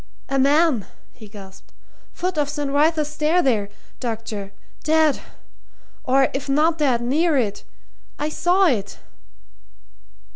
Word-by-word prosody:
"A 275 0 +1
man!" 280 - +3 0.3
he 220 - -13
gasped. 195 -2 -13 0.4
"Foot 365 0 -3
of 290 -1 0
St. 290 -2 -3
Wrytha's 305 +1 +2
Stair 305 +4 +1
there, 215 -7 +1 0.3
doctor. 225 -4 -5 0.3
Dead 315 -2 +3 0.8
or 270 -1 +3
if 275 +1 -4
not 315 +4 +2
dead, 260 -5 +2
near 300 +6 +1
it. 210 -6 -1 0.5
I 295 - -2
saw 355 +5 +2
it!" 215 - 0
280 Hz, 120 wpm, -22 LUFS, 235-315 Hz, 0.8 s, man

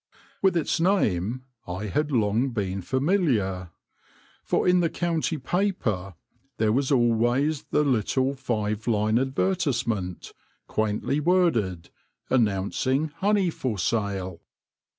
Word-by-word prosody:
With 190 -3 +3
its 165 +1 0
name 130 - +1 0.2
I 90 +4 -4
had 150 - -1
long 115 +1 +2
been 100 -5 -3
familiar, 130 - 0 0.7
for - - 0
in 180 0 +5
the 170 -2 +2
county 165 -2 -1
paper 125 - -1 0.4
there 110 -1 +2
was 135 +4 +1
always 120 +4 +2
the 150 - +1
little 130 +1 +1
five 110 -5 -2
line 110 0 +2
advertisement, 125 - -1 0.3
quaintly 110 +6 -1
worded, 130 - +1 0.4
announcing 130 +6 +1
honey 200 -3 +2
for 125 -8 -3
sale. 95 -3 -2
120 Hz, 110 wpm, -26 LUFS, 105-150 Hz, 0.7 s, in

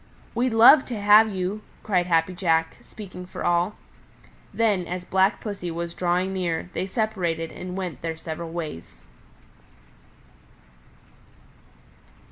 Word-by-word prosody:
"We'd 240 0 0
love 260 +5 +8
to 235 -4 -5
have 210 +2 +6
you!" 195 +1 -3 0.2
cried 180 -4 +1
Happy 165 +1 +2
Jack, 165 -3 0
speaking 180 -4 -10
for - - -7
all. 175 +4 +1 0.8
Then, 205 -6 +1
as 180 0 -5
Black 190 +2 +2
Pussy 200 -5 -5
was 170 0 -4
drawing 180 +2 0
near, 180 -1 -2
they 185 - -2
separated 185 -7 -2
and 180 +1 -7
went 180 -8 -5
their 165 -1 -4
several 165 +1 -6
ways. 155 - -7
180 Hz, 120 wpm, -24 LUFS, 170-205 Hz, 0.8 s, love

